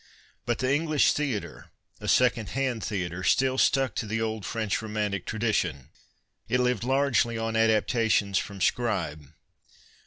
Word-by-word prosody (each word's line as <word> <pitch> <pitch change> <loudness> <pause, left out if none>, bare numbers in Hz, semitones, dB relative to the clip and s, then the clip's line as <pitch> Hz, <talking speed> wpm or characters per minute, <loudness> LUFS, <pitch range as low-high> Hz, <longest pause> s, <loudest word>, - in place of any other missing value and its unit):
But 120 -1 +1
the 130 - -2
Englisii 155 0 +3
theatre, 135 -9 -4 0.3
a - - -7
second 120 -4 +2
hand 130 -5 -1
theatre, 90 -3 -3
still 130 +6 +2
stuck 135 -2 +2
to 110 - -2
the 110 +2 -2
old 110 -2 -3
French 110 -3 -1
romantic 105 -4 -3
tradition. 100 - -1 0.6
It 125 - +2
lived 125 -3 +1
largely 130 -3 +1
on 115 0 -2
adaptations 110 -3 +2
from 100 -2 -7
Scribe. 85 - -1
110 Hz, 135 wpm, -27 LUFS, 100-125 Hz, 0.6 s, Englisii